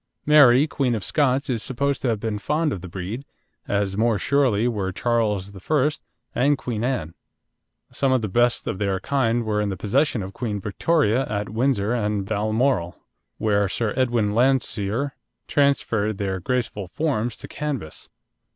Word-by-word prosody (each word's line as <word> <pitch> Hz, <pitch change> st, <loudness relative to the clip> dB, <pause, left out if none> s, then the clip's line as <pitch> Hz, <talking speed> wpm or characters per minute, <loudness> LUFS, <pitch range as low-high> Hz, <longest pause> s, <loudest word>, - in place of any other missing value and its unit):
Mary, 145 Hz, -3 st, +7 dB
Queen 135 Hz, -5 st, 0 dB
of 105 Hz, -, -4 dB
Scots 140 Hz, -, +1 dB
is 120 Hz, -5 st, -1 dB
supposed 140 Hz, +3 st, -1 dB
to -, -, -1 dB
have 115 Hz, -3 st, 0 dB
been 105 Hz, -1 st, -3 dB
fond 150 Hz, +5 st, 0 dB
of 90 Hz, -, -6 dB
the 90 Hz, -, -7 dB
breed, 95 Hz, +8 st, -5 dB, 0.4 s
as 100 Hz, -1 st, 0 dB
more 110 Hz, +1 st, +2 dB
surely 125 Hz, -4 st, +2 dB
were 100 Hz, -5 st, -1 dB
Charles 105 Hz, -3 st, 0 dB
I. 145 Hz, +9 st, +1 dB, 0.4 s
and 140 Hz, +4 st, +2 dB
Queen 120 Hz, -4 st, -3 dB
Anne. 120 Hz, -11 st, -2 dB, 0.8 s
Some 135 Hz, -1 st, +1 dB
of 130 Hz, -3 st, +2 dB
the -, -, 0 dB
best 120 Hz, +5 st, +2 dB
of 95 Hz, -, -3 dB
their 100 Hz, -2 st, 0 dB
kind 120 Hz, -3 st, 0 dB
were 105 Hz, -1 st, 0 dB
in 105 Hz, -, -1 dB
the 95 Hz, -, -4 dB
possession 115 Hz, -, +1 dB
of 95 Hz, +1 st, -7 dB
Queen 105 Hz, -3 st, -3 dB
Victoria 125 Hz, -, +1 dB
at 105 Hz, -1 st, -3 dB
Windsor 115 Hz, -1 st, +1 dB
and 105 Hz, -4 st, -1 dB
Balmoral, 110 Hz, -2 st, 0 dB, 0.4 s
where 100 Hz, -2 st, +1 dB
Sir 105 Hz, +2 st, -1 dB
Edwin 120 Hz, -5 st, +1 dB
Landseer 120 Hz, 0 st, +1 dB, 0.4 s
transferred 115 Hz, -7 st, +1 dB
their 95 Hz, -2 st, -2 dB
graceful 110 Hz, -1 st, -2 dB
forms 120 Hz, -, -1 dB
to -, -, -9 dB
canvas. 140 Hz, -, -5 dB
115 Hz, 160 wpm, -23 LUFS, 100-130 Hz, 0.8 s, Mary